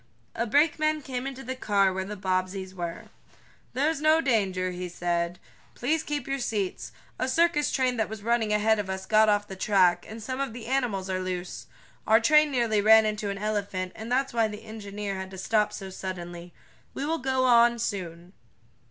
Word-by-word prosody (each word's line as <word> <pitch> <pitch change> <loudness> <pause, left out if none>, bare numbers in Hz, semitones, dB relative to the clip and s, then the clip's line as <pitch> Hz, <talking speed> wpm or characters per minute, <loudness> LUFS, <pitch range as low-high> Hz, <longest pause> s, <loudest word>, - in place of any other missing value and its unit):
A 235 +1 -2
brakeman 310 +3 +2
came 255 0 -4
into 270 0 -7
the 260 - -4
car 200 -6 +2
where 190 0 -2
the 205 +2 -7
Bobbseys 185 0 -2
were. 175 -2 -5 0.7
"There's 295 +3 0
no 310 +1 +5
danger," 195 - +1
he 180 0 -5
said. 175 0 -2 0.4
"Please 305 +6 0
keep 295 -4 -4
your 275 0 -2
seats. 205 -6 -3 0.3
A 255 - 0
circus 330 0 +2
train 255 -2 +1
that 220 - 0
was 220 -1 -8
running 230 -1 +1
ahead 210 +1 +3
of 200 -2 -3
us 190 0 -4
got 215 +1 +4
off 205 0 +1
the 190 - -7
track, 190 -2 +3
and 220 +1 -8
some 255 +3 -4
of 275 -4 -2
the 235 -1 -8
animals 240 -7 -1
are 185 -1 -2
loose. 185 -1 -5 0.4
Our 220 +1 +6
train 300 +5 +5
nearly 235 -6 +1
ran 220 +1 +7
into 210 -1 -2
an 200 - -3
elephant, 200 -3 -2
and 220 +2 -7
that's 265 +1 +1
why 230 -2 +2
the 210 +1 -8
engineer 205 -2 -6
had 190 0 -6
to 190 - -10
stop 210 +3 +1
so 190 -1 -7
suddenly. 175 -2 -7 0.4
We 275 - -3
will 325 +2 -1
go 260 0 +1
on 235 -1 +6
I - - -9
soon." 180 -5 -5
215 Hz, 195 wpm, -27 LUFS, 190-255 Hz, 0.7 s, ran